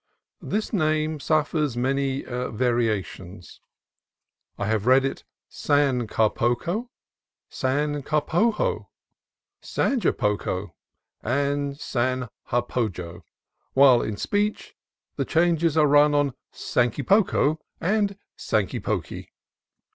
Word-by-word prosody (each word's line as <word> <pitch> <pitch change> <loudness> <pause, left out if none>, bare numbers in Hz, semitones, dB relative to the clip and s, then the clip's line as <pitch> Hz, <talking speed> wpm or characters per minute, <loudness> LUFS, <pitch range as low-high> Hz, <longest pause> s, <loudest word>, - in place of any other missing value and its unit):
(This 215 +2 -3
name 155 -3 0
suffers 150 -3 0
many 135 +2 0
variations. 110 -7 -3 1.0
I 100 - -2
have 110 0 -1
read 130 +1 +5
it 135 - -4 0.2
"San 140 -5 +1
Carpoco," 120 - 0 0.6
"San 145 +2 -1
Carpojo," 165 - 0 0.7
"Zanjapoco," 105 - -1 0.5
and 140 +3 -1
"Zanjapojo," 120 - -3 0.5
while 130 -3 +6
in 105 -1 -3
speech 205 - -2 0.4
the - - 0
changes 165 -1 +2
are 155 - +5
rung 145 0 +5
on 145 -2 +2 0.2
" - - -63
Sankypoko 150 - +1
" - - -48
and 200 +2 0 0.2
"Sankypoky." 105 -4 -2
140 Hz, 85 wpm, -24 LUFS, 120-155 Hz, 1.0 s, while